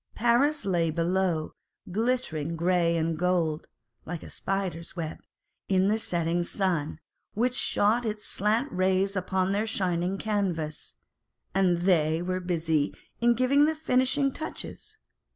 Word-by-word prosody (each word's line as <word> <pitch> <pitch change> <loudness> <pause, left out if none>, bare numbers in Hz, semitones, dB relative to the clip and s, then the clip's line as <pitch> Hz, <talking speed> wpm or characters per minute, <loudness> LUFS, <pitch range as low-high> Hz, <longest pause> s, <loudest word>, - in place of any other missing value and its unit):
Paris 260 +5 +2
lay 175 -4 +1
below, 170 0 0 0.4
_ - - -9
glittering 205 - -1
grey 170 0 +2
and 160 -1 -1
gold 170 -3 0 0.4
(like 170 0 -6
a - - -10
spider's 190 -4 -3
web) 165 -3 -4 0.5
in 190 0 +3
the 215 - +2
setting 170 -3 0
sun, 170 -4 -1 0.4
which 245 +3 +1
shot 230 -1 +2
its 215 -2 -3
slant 220 +8 +1
rays 190 +2 +1
upon 185 0 0
their 210 +3 0
shining 185 -3 -1
canvas, 185 -8 -2 0.6
and 185 -2 +3
they 160 -4 +3
were 185 +1 -2
busy 160 -4 0 0.3
in 235 0 +4
giving 270 +4 +4
the 315 +1 +1
finishing 275 -2 +1
touches. 430 +6 -7
185 Hz, 135 wpm, -27 LUFS, 170-220 Hz, 0.6 s, in